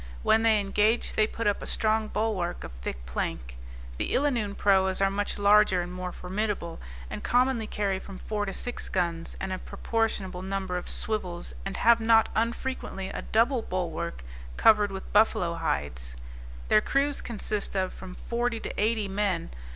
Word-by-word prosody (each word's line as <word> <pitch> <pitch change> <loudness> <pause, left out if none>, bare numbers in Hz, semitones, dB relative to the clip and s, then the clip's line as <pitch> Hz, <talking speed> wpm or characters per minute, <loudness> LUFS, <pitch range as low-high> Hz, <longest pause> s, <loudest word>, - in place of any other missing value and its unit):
When 220 - +4
they 225 -2 +4
engage, 210 +3 +1
they 215 - +3
put 230 +1 -5
up 205 -1 +1
a - - -6
strong 220 0 +1
bulwark 205 -5 -1
of - - -7
thick - - -6
plank; - - -4 0.4
the - - -1
Illanoon 240 -8 +1
proas 190 -2 +3
are 195 0 +3
much 205 +1 -2
larger 205 -3 +5
and 175 +1 -7
more 180 0 -4
formidable, 190 -2 -3 0.3
and - - -6
commonly 245 -2 +2
carry 200 -3 -1
from 195 0 -9
four 210 0 -3
to - - -2
six 245 +5 -5
guns, 170 -2 -2
and 190 -1 -3
a 185 - -4
proportionable 205 -5 -2
number 190 -1 -3
of 180 - -4
swivels, 180 - -3
and - - -4
have 235 0 +5
not 225 0 +5
unfrequently 230 -4 -2
a - - -5
double 235 +3 +2
bulwark 165 - -3 0.3
covered 210 -2 +5
with 190 0 -7
buffalo 200 -5 +4
hides; 70 - -3 0.5
their 105 - +5
crews 280 +1 +1
consist 210 -3 -3
of 190 -1 0
from 185 -1 -9
forty 235 0 -1
to - - -5
eighty 215 -1 +1
men. 195 -3 -1
200 Hz, 165 wpm, -28 LUFS, 180-220 Hz, 0.5 s, larger